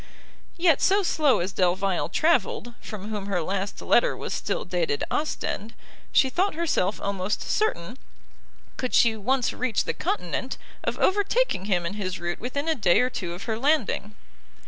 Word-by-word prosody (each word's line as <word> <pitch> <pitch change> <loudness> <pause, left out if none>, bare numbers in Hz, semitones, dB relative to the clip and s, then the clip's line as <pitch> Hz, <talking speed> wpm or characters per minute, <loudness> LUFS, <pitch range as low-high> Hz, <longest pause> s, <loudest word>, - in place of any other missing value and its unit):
Yet 335 -4 +4
so 395 +1 +4
slow 300 - +3
as 185 +3 -2
Delvile 185 0 +1
travelled, 240 - +1
from 215 -1 -7
whom 205 -2 -4
her 195 -3 0
last 195 +3 -3
letter - - +3
was - - -4
still - - -2
dated 455 -3 -1
Ostend, 230 -7 -2 0.4
she 265 - +5
thought 365 +7 0
herself 305 - 0
almost 200 0 -2
certain, 255 - -1 0.8
could 255 -1 -1
she 230 -2 +5
once 250 +4 0
reach 250 -3 0
the - - -2
continent, 200 +7 -2 0.3
of - - -2
overtaking 405 - +2
him 180 -4 +1
in 170 - -2
his 190 -3 -3
route 175 0 -3
within 280 +5 -3
a 320 - +3
day 190 - +3
or 250 +1 +1
two 175 -6 -4
of 180 - -7
her 220 -1 -2
landing. 240 -7 +1
225 Hz, 165 wpm, -26 LUFS, 190-310 Hz, 0.8 s, she